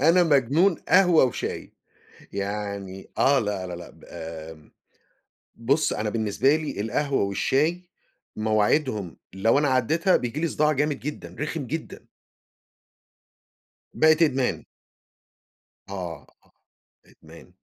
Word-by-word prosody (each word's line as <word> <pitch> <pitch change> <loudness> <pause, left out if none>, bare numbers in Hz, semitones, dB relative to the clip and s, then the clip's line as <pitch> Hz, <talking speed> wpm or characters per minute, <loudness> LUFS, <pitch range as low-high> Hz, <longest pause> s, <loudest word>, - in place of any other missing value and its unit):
أنا 165 +5 +5
مجنون 155 +4 +3
قهوة 180 -6 +6
وشاي، 125 - -4 0.6
يعني 100 -1 -5
آه 140 0 +4
لا، 100 -4 -3
لا، 90 - -5
لأ، 85 0 -10
ب - - -20
آمم، 80 -2 -9 0.8
بُص 135 +7 +1
أنا 105 0 -2
بالنسبة 110 +6 +1
لي 155 -10 -3
القهوة 135 +5 0
والشاي، 155 - 0 0.5
مواعيدهم 110 - 0 0.2
لو 105 +7 +2
أنا 145 - +1
عدّيتها، 155 +9 +2
بييجي 125 +4 -4
لي 165 - +1
صداع 150 -1 +1
جامد 150 0 0
جدًا، 150 +3 -7
رخم 150 -2 -3
جدًا. 160 +4 -6 1.8
بقت 155 +1 +4
إدمان. 135 -5 0 1.3
آه، 90 -5 -6 0.2
آه، - - -29 0.5
إدمان. - - -17
130 Hz, 110 wpm, -25 LUFS, 100-155 Hz, 1.8 s, قهوة